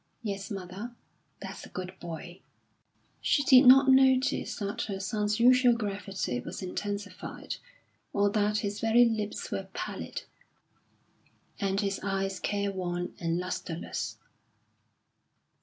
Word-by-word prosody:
"Yes, 200 -1 -4
mother." 200 +4 -6 0.5
"That's - - -7
a - - -10
good 185 0 -6
boy." 175 +1 -7 0.8
She 285 - +2
did 260 -2 +7
not 270 +2 +9
notice 265 0 +4
that 200 -2 -3
her 195 -2 -4
son's 210 +2 -1
usual 250 0 +6
gravity 195 - -3
was 155 - -7
intensified, 200 +2 -5 0.5
or 200 0 +3
that 210 0 +2
his 205 +1 -3
very 225 +2 +5
lips 215 -3 -2
were - - -3
pallid, - - -5 1.4
and 195 -1 0
his 195 -1 -1
eyes 195 0 -1
careworn 185 -4 -2
and 165 -1 0
lustreless. 180 -2 -4
200 Hz, 115 wpm, -29 LUFS, 190-225 Hz, 1.4 s, not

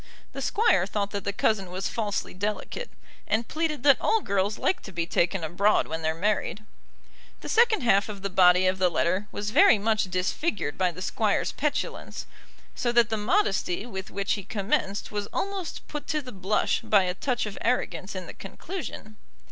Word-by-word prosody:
The - - -5
Squire 195 - +2
thought 205 -1 -2
that 200 -2 -4
the 200 - 0
cousin 200 -2 0
was 185 +2 -3
falsely 210 -3 -2
delicate, 210 - -4 0.4
and 220 +2 0
pleaded 310 -4 -2
that 280 -2 +5
all 445 -1 +2
girls 200 - 0
like 375 - 0
to 195 - -10
be 170 -2 -2
taken 175 +1 0
abroad 190 +6 +2
when 160 +1 -4
they're 160 0 0
married. 210 +3 -1 0.8
The - - -7
second 455 -3 +4
half 200 -2 +3
of 200 -2 -7
the 200 - -1
body 180 0 +5
of 185 0 +1
the 185 -1 +4
letter 185 +4 0
was 205 +1 -3
very 300 - +6
much 215 +1 +1
disfigured 185 - -1
by 185 -1 +2
the 180 +2 -7
Squire's 210 +1 0
petulance; 300 0 -3 0.5
so 240 - -1
that 235 -1 +4
the 220 - 0
modesty 210 - +1
with 190 -5 -6
which 195 0 -1
he 200 - -4
commenced 200 0 -1
was 205 -1 -3
almost 390 -3 -4
put 295 -1 -6
to 305 - 0
the 260 -4 -8
blush 195 +1 0
by 200 -3 +4
a 180 -1 -1
touch 245 +5 -1
of 210 - -7
arrogance 190 -5 -1
in 185 -1 -5
the - - -9
conclusion. 220 - -8
205 Hz, 190 wpm, -26 LUFS, 185-240 Hz, 0.8 s, very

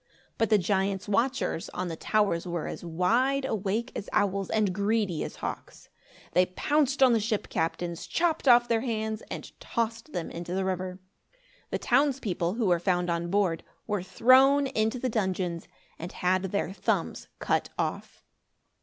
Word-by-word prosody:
But 225 - +2
the 215 - +6
giant's 195 +1 0
watchers, 230 -3 0
on 185 - -2
the 165 - -4
towers, 195 -2 0
were 170 -3 -3
as - - -6
wide 235 +12 +1
awake 220 +1 -1
as 205 - -5
owls 195 -1 +1
and 210 -4 +1
greedy 200 -4 0
as - - -6
hawks. - - -7 0.4
They 180 0 +4
pounced 280 +7 +1
on 255 -2 +6
the 230 - +3
ship 215 0 -2
captains, 170 +1 -2
chopped 330 -4 0
off 240 -1 +7
their 230 -1 +1
hands 220 -2 -2
and - - -6
tossed 230 0 -3
them 175 -3 -4
into 175 +1 -5
the 190 0 0
river. 185 -1 -3 0.7
The - - -1
townspeople, 240 -9 +1
who 230 -2 0
were 175 -3 +3
found 180 -1 +1
on 170 0 -2
board, 185 -4 +1 0.2
were 205 -3 -1
thrown 265 +8 +5
into 220 -2 0
the 255 - -2
dungeons 185 -6 -2 0.3
and 170 +2 -6
had 185 +1 0
their 190 0 -2
thumbs 200 -1 -1
cut - - 0
off. - - -4
205 Hz, 165 wpm, -28 LUFS, 180-230 Hz, 0.7 s, off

